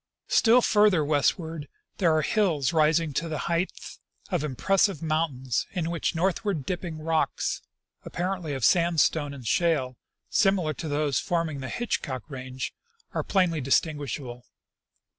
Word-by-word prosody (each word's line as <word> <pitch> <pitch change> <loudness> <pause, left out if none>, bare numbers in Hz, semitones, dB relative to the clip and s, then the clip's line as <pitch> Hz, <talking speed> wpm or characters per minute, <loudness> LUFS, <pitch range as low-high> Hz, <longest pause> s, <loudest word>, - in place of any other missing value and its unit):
" - - -56
Still 240 +2 +5
farther 205 -7 +4
westward 155 +1 0 0.3
there 175 -5 +4
are 155 - +1
hills 170 -9 +1
rising 155 0 +3
to 165 +4 -2
the 155 - -2
height 170 +2 0 0.6
of - - 0
impressive 190 - +1
mountains, 150 -6 -1
in 170 -3 -2
which 170 0 -1
northw; 185 +5 0
ard 185 -10 -2
dipping 175 -2 -4
rocks, 160 0 -1 0.4
appar 180 +2 -2
ently 150 -4 -4
of 130 - 0
sandstone 165 -4 +3
and 135 -4 -9
shale, 130 -2 +1 0.3
similar 185 -6 +2
to 160 - -6
those 145 -3 0
forming 165 -4 -1
the 130 - -5
Hitch 240 -1 -2
cock 130 -4 -5
range, 130 0 -5 0.4
are - - 0
plainly 180 -6 +1
distinguishable. 135 -3 -1
160 Hz, 145 wpm, -26 LUFS, 145-175 Hz, 0.6 s, Still